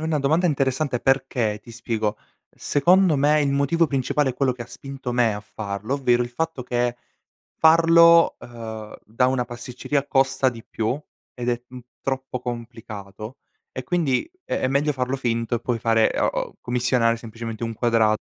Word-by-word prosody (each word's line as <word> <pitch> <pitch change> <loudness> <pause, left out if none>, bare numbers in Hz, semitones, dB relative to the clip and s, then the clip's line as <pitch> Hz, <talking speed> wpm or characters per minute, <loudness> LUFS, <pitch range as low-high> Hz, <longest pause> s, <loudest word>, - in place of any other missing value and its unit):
è - - -7
una 160 -1 0
domanda 160 +6 +2
interessante 135 -3 0
perché 130 -5 +1
ti 120 - -13
spiego, 110 -2 -2 0.4
secondo 175 +3 +3
me 150 +2 +3
il 145 -1 +1
motivo 140 +4 +2
principale 135 0 0
è - - -8
quello 130 -1 +1
che 125 - -16
ha - - -11
spinto 135 0 -7
me 120 -2 +2
a 105 - -5
farlo, 105 +3 -4
ovvero 125 -3 +2
il 120 - -4
fatto 160 +2 -3
che 120 0 -1 0.6
farlo, 165 +1 +6
uhm, 110 -2 -8
da 115 +4 +1
una 130 -1 +1
pasticceria 125 +4 -3
costa 135 -1 +2
di 115 -2 -10
più 110 +3 -2 0.4
ed 125 -1 -4
è, 120 0 0
mhmm, 125 0 -10 0.2
troppo 135 -1 -3
complicato, 115 -2 -7 0.3
e 130 - -5
quindi 160 - 0
è - - -2
è 130 - +1
meglio 145 +3 +1
farlo 130 0 -2
finto 120 -2 -1
e - - -3
poi 120 -1 -1
fare, 115 -1 +3
uh - - +2
uhm, - - -3
commissionare 120 -1 +1
semplicemente 115 0 -6
un 115 - -3
quadrato. 110 -2 +2
125 Hz, 175 wpm, -23 LUFS, 115-140 Hz, 0.6 s, farlo